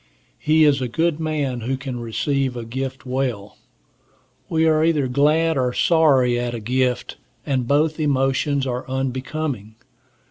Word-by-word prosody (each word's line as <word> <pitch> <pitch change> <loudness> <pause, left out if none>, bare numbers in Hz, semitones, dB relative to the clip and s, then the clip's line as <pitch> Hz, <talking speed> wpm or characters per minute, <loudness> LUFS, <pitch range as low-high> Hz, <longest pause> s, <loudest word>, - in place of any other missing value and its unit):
He 155 +1 +3
is 145 -3 +4
a 125 - -1
good 160 +5 0
man 145 -6 -2
who 130 +4 -2
can 130 -2 -5
receive 130 +3 -1
a 115 - -5
gift 130 +3 -5
well. 125 -6 -3 0.9
We 160 0 +2
are 155 -1 +3
either 155 -5 +2
glad 150 +4 +2
or 125 -1 0
sorry 135 -8 +3
at 120 0 -2
a - - -4
gift, 125 +3 -1 0.3
and 130 -4 -1
both 155 +3 +1
emotions 140 -1 +1
are 125 -1 -3
unbecoming. 130 -3 -3
135 Hz, 145 wpm, -21 LUFS, 125-150 Hz, 0.9 s, is